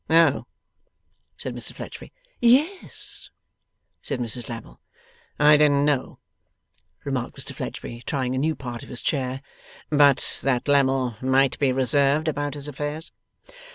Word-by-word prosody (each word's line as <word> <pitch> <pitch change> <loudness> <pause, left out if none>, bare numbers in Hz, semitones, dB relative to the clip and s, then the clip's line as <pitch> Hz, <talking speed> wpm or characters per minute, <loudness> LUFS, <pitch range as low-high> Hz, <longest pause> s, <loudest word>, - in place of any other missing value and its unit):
'Oh!' 165 +1 +4 0.9
said - - -5
Mr - - -6
Fledgeby. - - -9 0.3
'Yes,' 285 +11 +1 0.7
said 140 - -3
Mrs 120 0 -2
Lammle. 115 -2 -9 0.6
'I 150 0 +7
didn't 145 -1 +4
know,' 145 -3 0 0.9
remarked - - -3
Mr - - -5
Fledgeby, 120 0 -6
trying 130 -3 -1
a 130 - 0
new 155 +3 +1
part 120 -3 -7
of - - -12
his 125 - -5
chair, 130 -2 -1 0.5
'but 145 -2 +4
that 130 -1 0
Lammle 135 -4 +2
might 130 +1 +2
be 140 -2 +3
reserved 140 +4 +3
about 145 -1 -2
his 145 0 -7
affairs. 145 +3 -5
140 Hz, 130 wpm, -24 LUFS, 130-150 Hz, 0.9 s, I